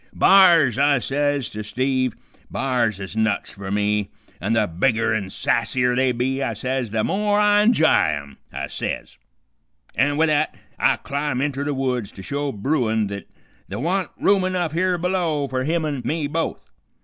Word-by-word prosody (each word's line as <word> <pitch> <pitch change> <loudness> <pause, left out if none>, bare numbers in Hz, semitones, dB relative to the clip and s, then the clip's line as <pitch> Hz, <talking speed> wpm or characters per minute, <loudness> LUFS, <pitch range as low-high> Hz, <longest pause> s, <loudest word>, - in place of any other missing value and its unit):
"'B'ars,' 170 - +6
I 140 0 +4
says 145 +1 -1
to 105 0 -5
Steve, 130 +3 -1 0.3
'b'ars 120 -6 0
is 95 +1 -7
nuts 110 -2 0
fer 100 -1 -8
me, 105 0 0 0.3
an' 100 +5 0
the 110 -2 +3
bigger 115 +6 +1
an' 100 -3 -2
sassier 125 +5 0
they 130 0 +2
be,' 130 +3 -1
I 115 - -1
says, 125 +2 -2
'the 110 +1 -1
more 205 +1 +1
I 210 0 +4
inj'y 160 - +3
'em,' 70 -1 -13
I - - -4
says, - - -5 0.7
an' 145 +2 +1
with 160 0 +3
that 155 0 +1 0.2
I - - +4
clim' 140 -2 -3
inter 140 0 -1
the 145 -1 -2
woods 125 -5 -2
to 95 - -10
show 145 +5 -2
bruin 110 -3 0
th't 100 -2 -7 0.4
th' 95 - -5
wa'n't 175 - -1
room 195 -1 +3
enough 180 -3 -1
here 180 +2 +1
below 170 -5 0
fer 130 -1 -2
me 160 +5 0
an' 140 -4 -3
him 150 +1 -2
both. 165 +1 -3
130 Hz, 175 wpm, -22 LUFS, 110-155 Hz, 0.7 s, B'ars